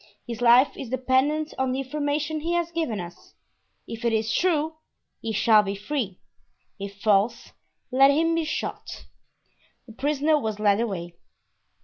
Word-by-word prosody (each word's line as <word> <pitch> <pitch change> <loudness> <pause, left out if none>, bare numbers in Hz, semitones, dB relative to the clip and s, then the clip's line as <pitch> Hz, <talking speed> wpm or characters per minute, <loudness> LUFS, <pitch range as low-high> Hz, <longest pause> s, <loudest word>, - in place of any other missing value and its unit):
His 235 -1 -6
life 245 +3 +5
is 260 - -7
dependent 260 +5 +1
on 265 -1 +1
the 260 - -2
information 295 +2 -2
he 335 +3 -2
has 345 -1 0
given 320 -11 -2
us; 175 -1 -10 0.5
if 230 0 -7
it 235 - +2
is 220 0 0
true, 320 -2 +1 0.4
he 225 - -3
shall 215 0 +5
be 200 -1 -4
free; 210 -3 -4 0.6
if 200 0 -7
false, 205 +1 +1 0.4
let 270 +2 +6
him 325 +4 +2
be 330 0 +1
shot." 310 - -5 0.8
The 225 - -13
prisoner 295 +4 +1
was 220 -5 -3
led 205 0 +3
away. 175 -7 -4
260 Hz, 150 wpm, -25 LUFS, 215-300 Hz, 0.8 s, let